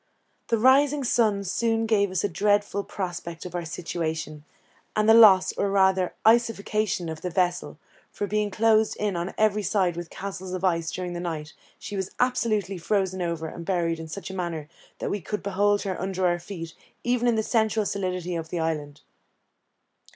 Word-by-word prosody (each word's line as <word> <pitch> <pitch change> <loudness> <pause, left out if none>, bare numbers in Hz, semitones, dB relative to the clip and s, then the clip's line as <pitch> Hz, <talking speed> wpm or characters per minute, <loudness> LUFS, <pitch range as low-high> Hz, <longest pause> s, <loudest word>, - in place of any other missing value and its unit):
The 230 - +2
rising 275 +4 +4
sun 215 -5 +2
soon 225 +4 0
gave 205 -3 +2
us 185 -1 -1
a - - +2
dreadful 205 +2 +1
prospect 175 -4 -5
of 180 - -7
our 175 -1 -3
situation, 160 -2 -4 0.5
and 215 0 +2
the 225 - +8
loss, 210 -5 +7
or 200 - 0
rather 190 -2 +2
iceification, 215 -4 +2
of 160 -1 -6
the 180 - -3
vessel; 180 0 -1 0.3
for 205 - -3
being 210 +1 0
closed 220 +1 +2
in 205 -3 -1
on 175 +2 -3
every 215 -1 +2
side 185 -3 +1
with 175 -1 -6
castles 190 -2 -6
of 185 0 -4
ice 165 -3 +1
during 180 -1 -4
the 175 - -4
night, 160 -3 -5 0.2
she 205 - -7
was 190 -1 -2
absolutely 215 -6 0
frozen 190 +1 0
over 170 -2 -2
and 170 - -8
buried 170 -2 0
in 160 - -7
such 190 +4 -7
a - - -7
manner 170 -5 -3 0.3
that - - -3
we 205 - -2
could 210 +5 -4
behold 205 +1 +1
her 190 -3 -3
under 190 0 -1
our 175 -1 +2
feet, 170 -3 -7 0.3
even 245 0 +1
in 235 - +3
the 220 - +1
central 220 -1 +1
solidity 185 -3 -2
of 165 -1 -4
the 175 - -3
island. 150 -3 -3
190 Hz, 185 wpm, -26 LUFS, 175-210 Hz, 0.5 s, the